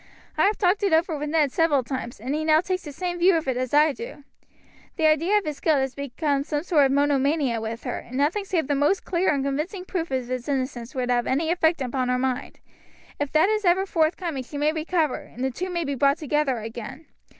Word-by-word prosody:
I -, -, +3 dB
have 425 Hz, -, 0 dB
talked 380 Hz, +1 st, +2 dB
it 395 Hz, -4 st, +1 dB
over 325 Hz, 0 st, +2 dB
with 295 Hz, 0 st, -4 dB
Ned 300 Hz, -3 st, +2 dB
several 300 Hz, -5 st, +2 dB
times, 240 Hz, -2 st, -5 dB
and 255 Hz, +6 st, -3 dB
he 310 Hz, +1 st, -1 dB
now 310 Hz, 0 st, +5 dB
takes 365 Hz, +2 st, -2 dB
the 295 Hz, -, -8 dB
same 350 Hz, +4 st, -4 dB
view 360 Hz, +1 st, +5 dB
of 320 Hz, -3 st, -1 dB
it 260 Hz, -, 0 dB
as 255 Hz, 0 st, -2 dB
I 300 Hz, 0 st, +4 dB
do. 465 Hz, -, -9 dB, 0.7 s
The 320 Hz, -, 0 dB
idea 320 Hz, +7 st, +3 dB
of 415 Hz, -, -1 dB
his 300 Hz, -2 st, -4 dB
guilt 315 Hz, -3 st, +2 dB
has 265 Hz, -1 st, -1 dB
become 280 Hz, +1 st, -1 dB
a 295 Hz, +1 st, -2 dB
sort 305 Hz, -6 st, +4 dB
of -, -, -2 dB
monomania 280 Hz, -3 st, +1 dB
with 225 Hz, +1 st, -5 dB
her, 250 Hz, -, -3 dB
and 255 Hz, +2 st, -8 dB
nothing 310 Hz, +9 st, +1 dB
save 355 Hz, -6 st, 0 dB
the 290 Hz, -, +1 dB
most 290 Hz, +7 st, +1 dB
clear 365 Hz, +1 st, +1 dB
and 280 Hz, -2 st, 0 dB
convincing 315 Hz, +7 st, -3 dB
proof 345 Hz, -3 st, -3 dB
of 260 Hz, -2 st, -2 dB
his 255 Hz, +1 st, -4 dB
innocence 260 Hz, -1 st, -3 dB
would 250 Hz, -1 st, -1 dB
have 240 Hz, -1 st, +1 dB
any 320 Hz, +5 st, +1 dB
effect 330 Hz, -4 st, +2 dB
upon 255 Hz, 0 st, -1 dB
her 250 Hz, -, +2 dB
mind. 260 Hz, +1 st, -3 dB, 0.6 s
If 290 Hz, -1 st, -2 dB
that 315 Hz, +5 st, +4 dB
is 430 Hz, 0 st, 0 dB
ever 370 Hz, +1 st, +3 dB
forthcoming 325 Hz, -4 st, 0 dB
she 270 Hz, +3 st, -8 dB
may 300 Hz, +2 st, +1 dB
recover, 315 Hz, -2 st, 0 dB
and 250 Hz, -, -9 dB
the 265 Hz, -, 0 dB
two 365 Hz, +9 st, -4 dB
may 345 Hz, -2 st, -2 dB
be 285 Hz, -2 st, -2 dB
brought 280 Hz, +2 st, +2 dB
together 295 Hz, -4 st, 0 dB
again. 235 Hz, +6 st, -7 dB
295 Hz, 240 wpm, -24 LUFS, 265-335 Hz, 0.7 s, now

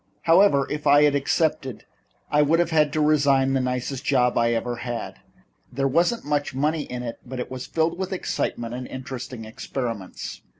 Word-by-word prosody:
However, 165 Hz, -4 st, +5 dB
if 150 Hz, 0 st, -3 dB
I 145 Hz, +1 st, +6 dB
had 145 Hz, -1 st, +4 dB
accepted 140 Hz, -2 st, 0 dB, 0.5 s
I 150 Hz, -, +4 dB
would 150 Hz, +3 st, +3 dB
have 170 Hz, -1 st, +1 dB
had 150 Hz, -2 st, +3 dB
to 155 Hz, -, 0 dB
resign 140 Hz, -3 st, +3 dB
the 135 Hz, -, +2 dB
nicest 125 Hz, +1 st, -3 dB
job 125 Hz, -3 st, +2 dB
I 115 Hz, 0 st, +2 dB
ever 120 Hz, +1 st, -2 dB
had. 120 Hz, -1 st, -5 dB, 0.5 s
There 135 Hz, +2 st, 0 dB
wasn't 175 Hz, -, +1 dB
much 145 Hz, -2 st, -1 dB
money 150 Hz, +2 st, 0 dB
in 125 Hz, 0 st, -6 dB
it, 115 Hz, -1 st, -6 dB
but 130 Hz, +1 st, -7 dB
it 125 Hz, -, -5 dB
was 130 Hz, -1 st, -6 dB
filled 165 Hz, +2 st, 0 dB
with 190 Hz, 0 st, -3 dB
excitement 120 Hz, -9 st, -3 dB
and 125 Hz, +1 st, -5 dB
interesting 130 Hz, -3 st, -7 dB
experiments. 115 Hz, -4 st, -5 dB
135 Hz, 180 wpm, -24 LUFS, 125-150 Hz, 0.5 s, I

